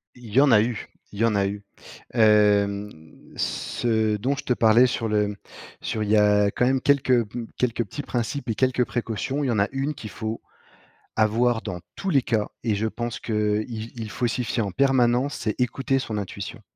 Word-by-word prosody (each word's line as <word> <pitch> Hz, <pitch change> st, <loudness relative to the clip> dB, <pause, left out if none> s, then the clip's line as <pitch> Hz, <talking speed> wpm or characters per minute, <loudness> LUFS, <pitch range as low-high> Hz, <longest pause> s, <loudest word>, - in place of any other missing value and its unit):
Il 120 Hz, -4 st, -12 dB
y 135 Hz, -, +6 dB
en 140 Hz, -3 st, +5 dB
a 105 Hz, -2 st, +7 dB
eu 115 Hz, -1 st, -3 dB, 0.3 s
il 100 Hz, -, -8 dB
y 115 Hz, -, +4 dB
en 115 Hz, -2 st, +2 dB
a 100 Hz, -, +2 dB
eu. 100 Hz, +1 st, -5 dB, 0.5 s
Hem, 105 Hz, -2 st, +3 dB, 0.5 s
ce 110 Hz, -3 st, 0 dB
dont 130 Hz, +7 st, 0 dB
je 145 Hz, -, -7 dB
te -, -, -4 dB
parlais 115 Hz, +2 st, +5 dB
sur 115 Hz, -1 st, -2 dB
le 105 Hz, -1 st, 0 dB, 0.5 s
sur 110 Hz, -1 st, -2 dB
il 105 Hz, -, -3 dB
y 110 Hz, -, +5 dB
a 105 Hz, -1 st, +4 dB
quand 125 Hz, -, +1 dB
même 130 Hz, 0 st, +2 dB
quelques 130 Hz, -4 st, +3 dB, 0.3 s
quelques 120 Hz, -2 st, 0 dB
petits 125 Hz, +9 st, -6 dB
principes 120 Hz, +2 st, -3 dB
et 110 Hz, -, 0 dB
quelques 130 Hz, -1 st, +2 dB
précautions. 120 Hz, +4 st, -3 dB
Il -, -, 0 dB
y 125 Hz, -, +1 dB
en 110 Hz, -, +1 dB
a 100 Hz, -, +2 dB
une 135 Hz, +3 st, -2 dB
qu'il 110 Hz, -5 st, -9 dB
faut 110 Hz, +2 st, -5 dB, 0.7 s
avoir 110 Hz, +2 st, +2 dB
dans 90 Hz, 0 st, -5 dB, 0.2 s
tous 195 Hz, -1 st, -3 dB
les 135 Hz, -3 st, +4 dB
cas 110 Hz, -3 st, -1 dB
et 110 Hz, -3 st, +1 dB
je 105 Hz, +2 st, -1 dB
pense 120 Hz, +1 st, -4 dB
qu'il 105 Hz, -1 st, 0 dB, 0.3 s
il 110 Hz, -2 st, -5 dB
faut 120 Hz, -, -1 dB
s'y 120 Hz, +2 st, -2 dB
fier 115 Hz, 0 st, -1 dB
en 100 Hz, -, -4 dB
permanence, 130 Hz, +2 st, +2 dB
c'est 110 Hz, +1 st, -3 dB
écouter 135 Hz, +2 st, 0 dB
son 110 Hz, -4 st, -4 dB
intuition. 100 Hz, -1 st, -6 dB
115 Hz, 205 wpm, -24 LUFS, 105-125 Hz, 0.7 s, a